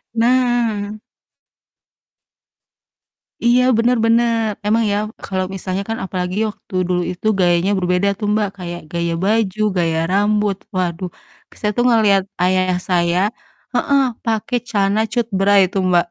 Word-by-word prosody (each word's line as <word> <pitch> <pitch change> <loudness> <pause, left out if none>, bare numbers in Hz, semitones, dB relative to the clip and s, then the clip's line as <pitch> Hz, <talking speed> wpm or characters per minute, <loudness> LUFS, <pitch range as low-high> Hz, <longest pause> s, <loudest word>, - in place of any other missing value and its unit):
Nah. 235 -3 +1 2.5
Iya, 245 +1 +5 0.2
bener 240 +2 +2
bener. 230 -1 +2 0.2
Emang 225 +2 +2
ya 205 - +1 0.3
kalau 185 -1 -2
misalnya 190 +1 -3
kan 225 - -2
apalagi 185 0 -3
waktu 195 - -11
dulu 180 -1 0
itu 180 +4 -5
gayanya 175 +2 +3
berbeda 180 +2 +1
tuh, 210 - -2
Mbak, 210 -2 +1
kayak 175 -1 -6
gaya 170 -1 -1
baju, 215 -1 +1 0.2
gaya 165 -2 +1
rambut, 205 0 +1 0.2
waduh. 180 0 -2 0.5
Saya 210 -1 +1
tuh 240 - +3
ngelihat 210 -5 +4 0.2
ayah 185 0 +2
saya 175 -1 +2 0.6
heeh, 280 -1 +2 0.2
pake 225 +2 -1
celana 205 0 +1
cutbray 200 -4 +2
tuh, 195 - +1
Mbak, 175 -1 +3
200 Hz, 125 wpm, -19 LUFS, 180-225 Hz, 2.5 s, Iya